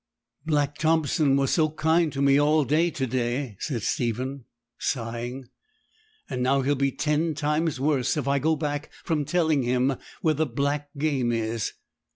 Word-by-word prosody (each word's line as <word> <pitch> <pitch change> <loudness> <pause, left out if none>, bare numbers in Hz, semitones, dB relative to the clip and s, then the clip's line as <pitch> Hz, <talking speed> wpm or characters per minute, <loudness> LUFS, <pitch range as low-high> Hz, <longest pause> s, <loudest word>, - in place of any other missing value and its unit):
'Black 145 -2 0
Thompson 155 -2 +2
was 135 -1 +1
so 155 -2 +3
kind 160 +1 +2
to 140 0 -1
me 140 0 +5
all 150 0 +3
to 160 +6 +2
day,' 125 -1 -2
said 120 -8 -3
Stephen, 125 +2 -2 0.3
sighing; 120 +1 -3 0.8
'and 125 -2 -3
now 135 +2 +3
he'll 140 +2 +2
be 140 0 +1
ten 155 +3 0
times 150 0 0
worse 140 -1 +1
if 140 -3 -2
I 140 0 +2
go 160 +3 +2
back 145 0 -3
from 155 -3 0
telling 155 -2 +2
him 125 +2 +1 0.3
where 160 - +3
the 155 +1 0
black 140 +3 -1
game 140 -5 +1
is.' 115 -1 -2
140 Hz, 160 wpm, -26 LUFS, 130-155 Hz, 0.8 s, me